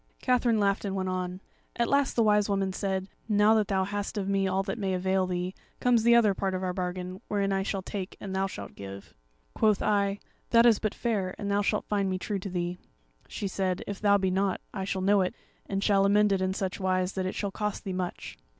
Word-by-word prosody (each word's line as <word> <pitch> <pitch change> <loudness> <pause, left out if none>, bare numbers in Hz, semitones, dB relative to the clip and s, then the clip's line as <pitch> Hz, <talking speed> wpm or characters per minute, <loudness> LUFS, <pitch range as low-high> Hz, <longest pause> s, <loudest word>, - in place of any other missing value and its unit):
Katherine 245 -3 +2
laughed 200 0 +1
and 195 -2 -2
went 190 -1 -1
on: 185 0 -3 0.3
"At 235 -1 +1
last 280 -1 +2
the 230 - +4
Wise 210 -1 +3
Woman 195 -1 0
said, 190 -1 -2 0.2
'Now 210 +1 +5
that 215 -2 +2
thou 190 -1 +1
hast 205 +2 -3
of 195 -2 -2
me 195 -1 +1
all 190 +1 +1
that 195 +3 -4
may 190 -2 0
avail 190 +1 +1
thee, 180 +1 -2 0.3
comes 245 -2 +3
the 235 +1 +5
other 220 -4 +5
part 190 0 -2
of 185 - -3
our 180 -1 -1
bargain, 180 0 -4
wherein 200 -1 0
I 195 - +1
shall 195 -1 -2
take 190 -1 -5
and 190 -2 -5
thou 190 0 +1
shalt 100 - -8
give.' 100 0 -9 0.4
"Quoth 215 -2 +2
I, 200 -1 +2 0.3
'That 230 0 +6
is 230 -4 +6
but 215 - -2
fair, 200 -6 -1
and 200 -1 -3
thou 200 0 +2
shalt 210 +1 0
find 200 -2 0
me 185 - -1
true 200 +1 -3
to 195 - -6
thee.' 180 0 -3 0.5
She 200 - -4
said, 190 -1 -1
'If 200 -1 -6
thou 200 -1 +5
be 190 -1 0
not, 190 0 +1
I 190 -2 -3
shall 190 -1 -2
know 200 +1 +4
it, 180 - -1 0.3
and 195 0 -2
shall 200 -2 +4
amend 205 +1 +4
it 195 -1 +1
in 190 0 0
such 190 -1 -3
wise 185 0 0
that 190 -1 -2
it - - -4
shall 200 -2 -2
cost 210 +1 -3
thee 190 - -4
much.' 180 - -5
195 Hz, 240 wpm, -28 LUFS, 185-205 Hz, 0.5 s, That